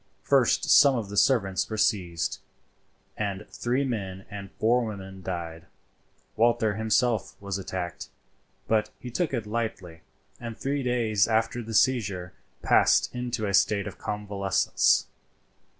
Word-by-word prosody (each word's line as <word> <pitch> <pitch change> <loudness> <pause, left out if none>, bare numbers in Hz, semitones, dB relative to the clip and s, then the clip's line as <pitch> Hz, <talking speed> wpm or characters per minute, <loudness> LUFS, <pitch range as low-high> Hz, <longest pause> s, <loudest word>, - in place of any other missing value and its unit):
First - - +3
some 140 -2 +7
of 110 -5 -3
the 100 - -6
servants 100 -6 +2
were 110 - -4
seized, 90 -7 0 0.8
and 100 -1 -3
three 125 +4 -1
men 95 -6 -4
and 100 -1 -7
four 120 +3 +2
women 95 -3 -7
died. 85 -3 -6 0.7
Walter 115 -2 +2
himself 110 +1 0
was 100 -1 -4
attacked, 90 -2 -5 0.6
but 110 -1 +1
he 125 - -8
took 165 +6 -1
it 120 -5 -2
lightly, 105 -7 -4 0.4
and 115 -2 -7
three 140 +1 -2
days 115 -5 +1
after 115 +2 0
the 115 -1 -6
seizure 100 -8 +1 0.3
passed - - +4
into 125 -3 -3
a 100 - -2
state 100 +1 +3
of 100 -2 -8
convalescence. 100 -2 +1
105 Hz, 135 wpm, -27 LUFS, 95-120 Hz, 0.8 s, some